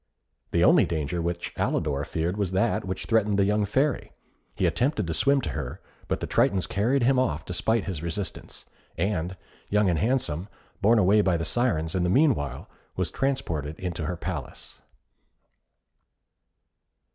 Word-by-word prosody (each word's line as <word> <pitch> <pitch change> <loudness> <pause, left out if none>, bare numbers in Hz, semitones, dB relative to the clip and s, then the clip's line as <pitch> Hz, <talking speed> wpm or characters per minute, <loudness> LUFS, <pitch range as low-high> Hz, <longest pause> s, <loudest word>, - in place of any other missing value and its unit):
The - - +2
only - - +6
danger 80 +1 -2
which 85 +1 -3
Alidor 70 -2 0
feared 85 +3 -1
was 100 -3 -2
that 105 +2 +1
which 95 0 -4
threatened 105 -3 +2
the 100 - +4
young 105 +1 +2
Fairy. 135 +7 0 0.4
He - - 0
attempted 125 - +1
to 80 - -2
swim 140 - +3
to - - -3
her, 70 -5 -5 0.3
but - - -2
the - - -1
Tritons 95 -2 +2
carried 120 +6 +1
him 130 +1 +4
off 80 -11 -1
despite 110 +5 0
his 90 -6 -4
resistance, 85 +4 -4 0.3
and 95 -2 -1 0.3
Young 105 -2 +3
and 80 - 0
Handsome, 95 - 0 0.3
borne 110 +4 +5
away 105 +1 +5
by 95 -4 +2
the 80 - -3
Syrens 80 -6 0
in 95 - 0
the 90 - +1
meanwhile, 95 - +1 0.3
was - - -1
transported 85 - -2
into 85 -4 -3
her 90 - -3
palace. 80 -7 -6
95 Hz, 160 wpm, -26 LUFS, 80-110 Hz, 0.4 s, only